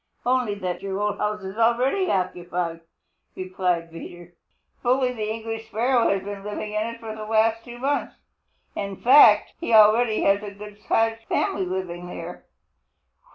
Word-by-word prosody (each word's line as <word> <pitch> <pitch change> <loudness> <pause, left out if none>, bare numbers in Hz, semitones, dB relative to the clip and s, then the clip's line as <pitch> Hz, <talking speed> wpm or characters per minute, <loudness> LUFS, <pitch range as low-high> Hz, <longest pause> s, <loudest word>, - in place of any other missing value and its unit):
"Only 250 -4 +1
that 185 -2 -4
our 195 0 -3
old 210 0 -1
house 210 -1 -2
is 190 +3 -7
already 255 +11 +2
occupied," 175 -2 -2 0.6
replied 180 -2 -2
Peter. 175 +1 -10 0.5
"Bully 250 +1 +1
the 215 -3 -4
English 225 0 -5
Sparrow 235 +2 +2
has 195 -1 0
been 200 0 -7
living 210 +1 -5
in 215 +1 -1
it 230 0 -7
for 220 -1 -7
the 215 - -7
last 220 +1 +1
two 240 0 -10
months. 275 +4 -2 0.6
In 200 -1 -4
fact, 260 +8 +6
he 235 -10 +1
already 220 +1 +5
has 200 +1 +3
a 210 - -6
good 210 0 -11
sized 225 +1 0
family 195 -3 -1 0.2
there." 175 0 -8
215 Hz, 155 wpm, -24 LUFS, 195-230 Hz, 0.6 s, fact